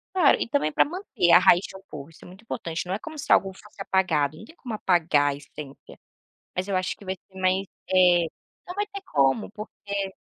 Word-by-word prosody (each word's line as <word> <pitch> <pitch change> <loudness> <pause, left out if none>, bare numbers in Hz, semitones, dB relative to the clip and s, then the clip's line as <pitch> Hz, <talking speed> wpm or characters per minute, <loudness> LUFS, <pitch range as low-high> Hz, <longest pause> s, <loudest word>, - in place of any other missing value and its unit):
Claro, 350 -6 +5
e - - -1
também 235 - +1
para - - +4
manter 285 - 0
a - - +9
raiz 175 -1 +6
de - - -10
um - - -15
povo, 145 0 -8
isso 165 - -19
é - - -12
muito 185 +3 -14
importante. 165 -7 -4
Não 185 - -2
é 200 - -2
como 315 +6 -9
se 285 - -4
algo 195 -1 +4
fosse 205 +1 -14
apagado, 155 -7 +1
não 215 - -11
tem 320 - -17
como 245 -8 -7
apagar 160 -8 +2
a - - -4
essência, 140 0 -12 0.6
mas 185 +1 -2
eu 200 - -1
acho 185 0 -1
que 200 - -16
vai 190 0 -2
ser 190 +1 -16
mais 185 +1 +1 0.3
eh, 180 -2 +5 0.4
não 360 - -6
vai 410 +1 0
ter 400 -1 -8
como 140 - +2
porque 200 -2 -5
190 Hz, 235 wpm, -25 LUFS, 170-215 Hz, 0.6 s, a